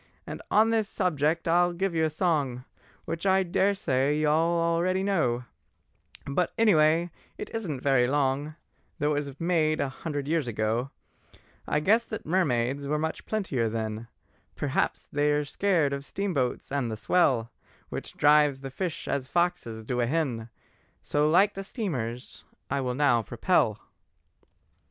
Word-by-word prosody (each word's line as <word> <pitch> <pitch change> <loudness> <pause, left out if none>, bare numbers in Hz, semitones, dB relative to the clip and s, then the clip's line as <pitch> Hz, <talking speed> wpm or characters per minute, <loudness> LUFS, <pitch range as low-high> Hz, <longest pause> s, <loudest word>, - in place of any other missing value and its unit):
And - - -7
on 220 +2 +4
this 220 -2 +1
subject 165 -3 0
I 175 +2 +4
will 175 - -4
give 190 +1 -1
a 160 -1 +2
song, 145 -7 -1 0.4
Which 165 +4 -3
I 190 0 +4
daresay 170 -7 +1
you 155 0 +2
all 165 +3 +2
already 170 +3 +1
know, 155 -12 +1 0.8
But 150 +5 0
anyway 170 -5 +4 0.3
it - - -7
isn't 175 - -3
very 135 -3 +3
long, 145 +2 0 0.4
Though 150 -1 +1
it 145 0 -1
was 140 0 -10
made 160 -2 +1
a 140 - 0
hundred 145 0 -5
years 160 -4 0
ago, 115 +3 -1 0.8
I 150 - +1
guess 220 +8 +4
that 220 - -6
mermaids 140 -5 0
were 150 +2 0
much 160 +1 -4
plentier 145 - -1
then; 110 0 -4 0.5
Perhaps - - -1
they're 145 0 +1
scared 160 -2 +1
of 140 0 -4
steamboats 145 -10 -2
and 135 -4 -1
the 110 - -4
swell 120 -3 +2 0.4
Which - - -7
drives 145 -2 +4
the 135 -1 -6
fish 175 +3 -4
as 135 -2 -2
foxes 170 -11 -1
do 125 +1 -1
a 120 - +1
hen— 125 -6 -1 0.5
So 150 +1 +1
like 195 +6 +4
the 195 - -6
steamers 130 - -5 0.3
I 140 - 0
will 125 -1 -2
now 135 -4 +3
propel." 110 - +1
150 Hz, 150 wpm, -27 LUFS, 130-175 Hz, 0.8 s, on